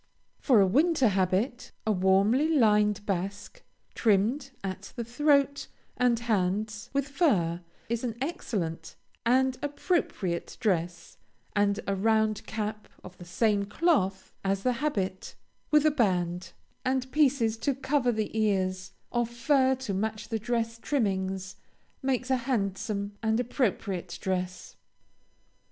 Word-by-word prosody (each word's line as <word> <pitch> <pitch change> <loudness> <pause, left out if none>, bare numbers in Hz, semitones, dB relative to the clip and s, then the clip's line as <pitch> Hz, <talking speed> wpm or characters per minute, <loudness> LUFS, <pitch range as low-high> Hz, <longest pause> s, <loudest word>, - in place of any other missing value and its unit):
For 250 -7 +4
a - - +6
winter 275 - +3
habit, 195 +6 0
a 220 - +2
warmly 200 +9 +3
lined 210 -7 +3
basque, 195 +1 -4 0.3
trimmed 230 +6 +2
at 190 0 -6
the 235 - -3
throat 280 +3 +2 0.3
and 250 -2 +3
hands 210 -1 -1
with 280 0 0
fur, 195 - +1 0.3
is 235 +1 -2
an 235 -2 -3
elegant 190 - -3 0.3
and 260 +1 +3
appropriate 290 - -2
dress, 175 -4 -1 0.4
and 205 0 +2
a 200 - 0
round 220 +1 +1
cap 215 -1 -4 0.2
of 185 0 -11
the 175 - -9
same 205 +3 +1
cloth 200 - 0
as 195 0 0
the 250 - +2
habit, 205 -9 -2 0.3
with 300 0 +4
a 310 - +5
band, 180 - 0 0.3
and 260 0 -1
pieces 270 -7 +3
to 280 +1 0
cover 270 -2 +1
the 220 -1 -3
ears, 190 -3 0 0.2
of 240 -1 0
fur 260 +2 +2
to 260 -6 -4
match 215 +2 -3
the 225 -2 -1
dress 230 0 -2
trimmings, 190 -7 -1 0.4
makes 265 -1 -1
a 260 - +4
handsome 205 -4 -2
and 220 0 +1
appropriate 200 -8 -1
dress. 185 -1 -3
220 Hz, 130 wpm, -28 LUFS, 195-260 Hz, 0.4 s, a